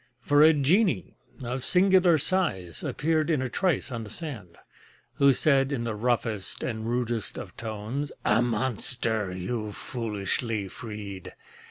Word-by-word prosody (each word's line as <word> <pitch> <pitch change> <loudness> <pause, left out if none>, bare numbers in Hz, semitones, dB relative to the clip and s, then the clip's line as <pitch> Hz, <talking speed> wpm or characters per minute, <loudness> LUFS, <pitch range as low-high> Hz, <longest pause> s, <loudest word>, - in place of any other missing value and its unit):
For 145 +3 +3
a 155 +1 +8
genie 155 - +2 0.3
of 125 +1 -3
singular 185 -2 +4
size 135 - -1
Appeared 155 +1 0
in 155 -4 +2
a 130 - -2
trice 170 0 0
on 115 -2 -4
the 105 - -9
sand, 120 - -5 0.6
Who 140 0 +6
said 135 0 +3
in 130 -4 -1
the 115 -1 -2
roughest 110 -3 -1
and 110 -2 -3
rudest 120 -2 -1
of - - -8
tones: 115 +6 -4
"A 115 - +4
monster 115 -3 0
you've 105 +3 -4
foolishly 110 -2 -3
freed! 105 -4 -8
120 Hz, 140 wpm, -27 LUFS, 105-145 Hz, 0.6 s, a